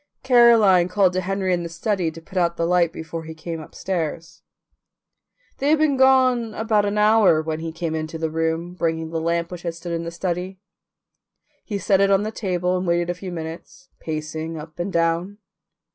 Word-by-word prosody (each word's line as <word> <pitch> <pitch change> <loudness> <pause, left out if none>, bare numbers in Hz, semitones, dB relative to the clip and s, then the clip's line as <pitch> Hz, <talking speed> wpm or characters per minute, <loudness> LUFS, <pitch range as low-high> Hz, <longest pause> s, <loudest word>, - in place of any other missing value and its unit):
Caroline 230 -8 +6
called 185 0 +2
to 185 - 0
Henry 190 0 -1
in 175 - 0
the 170 - -5
study 175 +1 -1
to 160 +1 -10
put 185 +4 -17
out 170 -2 +1
the 165 - 0
light 175 -1 +2
before 165 0 -7
he 160 0 -8
came 165 +1 -6
upstairs. 165 0 -5 1.2
They 280 - +1
had 310 - +5
been 300 -2 +2
gone 255 -4 +3
about 215 -2 +1
an 205 +1 -1
hour 210 -6 +5
when 155 0 -3
he 165 0 -4
came 165 0 -4
into 160 +1 -4
the 160 -1 -2
room 165 +2 -2
bringing 160 -2 -2
the 165 -1 -2
lamp 170 +1 -1
which 175 -1 -7
had 170 -1 -4
stood 170 +1 -7
in 165 0 -2
the 170 - -4
study. 180 +2 -4 1.0
He 205 - -4
set 195 0 +2
it 195 - +4
on 195 0 +3
the 215 - -3
table 180 -4 -1
and 180 0 -2
waited 170 0 +1
a - - -2
few 180 +1 -8
minutes, 165 +2 -8
pacing 160 +1 -5
up 155 +2 -10
and 180 +3 -2
down. 170 +4 0
175 Hz, 200 wpm, -22 LUFS, 165-195 Hz, 1.2 s, Caroline